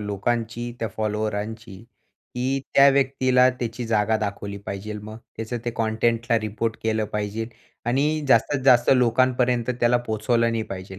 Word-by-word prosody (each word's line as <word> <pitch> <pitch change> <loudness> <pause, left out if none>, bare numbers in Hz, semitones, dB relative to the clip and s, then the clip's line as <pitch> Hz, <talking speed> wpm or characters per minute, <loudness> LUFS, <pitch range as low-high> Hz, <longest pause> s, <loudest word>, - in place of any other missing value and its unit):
लोकांची, 115 +3 -2
त्या 115 - -2
फॉलोअरांची, 110 -1 -3 0.6
की 130 +2 -1
त्या 140 0 +8
व्यक्तीला 130 -2 +3
त्याची 120 -1 -5
जागा 110 0 +2
दाखवली 100 -1 -4
पाहिजे. 105 +2 -5
मग 110 +1 -9 0.2
त्याचं 115 +2 -4
ते 120 - -1
कंटेंटला 115 +1 +1
रिपोर्ट 110 +1 -3
केलं 110 -1 0
पाहिजे 105 +2 -3 0.4
आणि 145 +5 +1
जास्तीत 130 +3 +3
जास्त 120 -3 +5
लोकांपर्यंत 125 0 +2
त्याला 120 +1 +4
पोहोचवलं 115 +2 +1
नाही 115 -1 -1
पाहिजे. 95 0 -8
115 Hz, 135 wpm, -24 LUFS, 110-125 Hz, 0.6 s, त्या